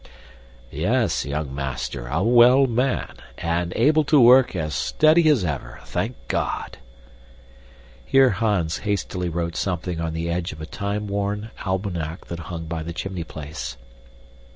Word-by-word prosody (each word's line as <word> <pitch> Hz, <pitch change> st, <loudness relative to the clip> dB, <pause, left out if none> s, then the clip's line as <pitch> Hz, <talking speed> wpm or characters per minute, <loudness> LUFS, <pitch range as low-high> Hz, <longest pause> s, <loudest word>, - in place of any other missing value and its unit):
"Yes, -, -, 0 dB
young 70 Hz, -1 st, -3 dB
master, 60 Hz, -3 st, -4 dB
a 80 Hz, +9 st, 0 dB
well 120 Hz, +4 st, +6 dB
man, 125 Hz, +1 st, -1 dB, 0.2 s
and 85 Hz, +1 st, -1 dB
able 150 Hz, +6 st, +4 dB
to 150 Hz, 0 st, +5 dB
work 125 Hz, -2 st, +6 dB
as 80 Hz, -3 st, -2 dB
steady 155 Hz, -, +4 dB
as 130 Hz, -12 st, +3 dB
ever, 65 Hz, -6 st, -4 dB
thank -, -, -2 dB
God!" -, -, -2 dB, 1.2 s
Here 135 Hz, -, +4 dB
Hans 100 Hz, -6 st, 0 dB
hastily 95 Hz, -3 st, -2 dB
wrote 85 Hz, 0 st, -3 dB
something 90 Hz, -2 st, -2 dB
on 80 Hz, -1 st, -2 dB
the 80 Hz, +1 st, -3 dB
edge 85 Hz, 0 st, -2 dB
of 75 Hz, -, -12 dB
a 80 Hz, -, -5 dB
time 100 Hz, +4 st, -3 dB
worn 100 Hz, +2 st, -3 dB, 0.2 s
almanac 90 Hz, -4 st, -3 dB
that 85 Hz, -, -5 dB
hung 85 Hz, -2 st, -5 dB
by 80 Hz, 0 st, -4 dB
the 85 Hz, +2 st, -5 dB
chimney 95 Hz, 0 st, -4 dB
place. 70 Hz, -6 st, -7 dB
90 Hz, 145 wpm, -23 LUFS, 80-110 Hz, 1.2 s, well